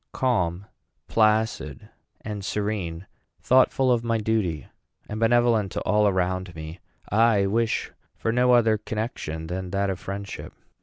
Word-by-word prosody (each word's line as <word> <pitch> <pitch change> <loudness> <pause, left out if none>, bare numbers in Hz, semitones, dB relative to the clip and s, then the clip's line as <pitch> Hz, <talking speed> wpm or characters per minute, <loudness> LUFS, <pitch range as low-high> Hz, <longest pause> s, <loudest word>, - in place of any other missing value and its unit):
Calm, 95 -8 0 0.4
placid, 110 - +1 0.3
and 105 -2 -5
serene, 100 -5 -3 0.3
thoughtful 130 0 +3
of 120 -1 +2
my 115 -1 +1
duty, 105 - -1 0.4
and 110 - -5
benevolent 115 -3 +3
to - - -2
all 105 0 +3
around 95 -2 -1
me, 80 +2 -8 0.3
I 110 -1 +4
wish 115 +3 0 0.2
for 115 - -1
no 125 +1 +3
other 115 -3 +4
connection 105 - -4
than 90 +2 -4
that 100 +1 0
of 95 - -5
friendship. 100 +1 -7
105 Hz, 135 wpm, -25 LUFS, 95-115 Hz, 0.4 s, I